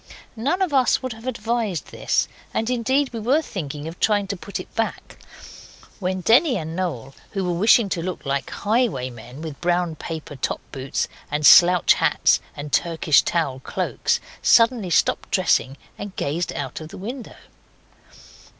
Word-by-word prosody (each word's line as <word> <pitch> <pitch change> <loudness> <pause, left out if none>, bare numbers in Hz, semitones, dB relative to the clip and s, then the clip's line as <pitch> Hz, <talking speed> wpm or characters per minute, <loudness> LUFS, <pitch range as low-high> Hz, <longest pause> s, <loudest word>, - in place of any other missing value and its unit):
None 285 +12 0
of 350 -6 -2
us 260 -1 +3
would 255 -2 -3
have 225 +3 -11
advised 230 -6 -2
this, - - 0 0.3
and 225 +3 0
indeed 260 +3 +1
we 230 - -4
were 265 +9 +2
thinking 150 - -6
of 165 +2 -8
trying 205 -2 +2
to 200 - -2
put 200 +2 -6
it - - -10
back, 225 0 -4 0.8
when 185 -1 -2
Denny 245 - +4
and 160 -1 -5
Noel, 145 -8 -3 0.2
who 195 - -1
were 180 -1 -1
wishing 210 +5 +4
to 170 - -2
look 180 -1 -5
like 140 0 -2
highwaymen, 135 - -2
with 155 -4 -7
brown 175 -1 +1
paper 160 -2 -7
top 130 - -2
boots 135 +1 -2 0.2
and 150 +1 -1
slouch 180 +2 +7
hats - - +3 0.2
and 145 0 -6
Turkish 165 -3 +3
towel 140 -6 -1
cloaks, - - -1 0.2
suddenly 230 -4 +4
stopped - - +1
dressing 155 -7 +1 0.2
and 205 -2 -7
gazed 165 +5 -2
out 135 +1 -5
of 155 - -8
the - - -10
window. 235 +6 -7
180 Hz, 160 wpm, -22 LUFS, 155-230 Hz, 0.8 s, slouch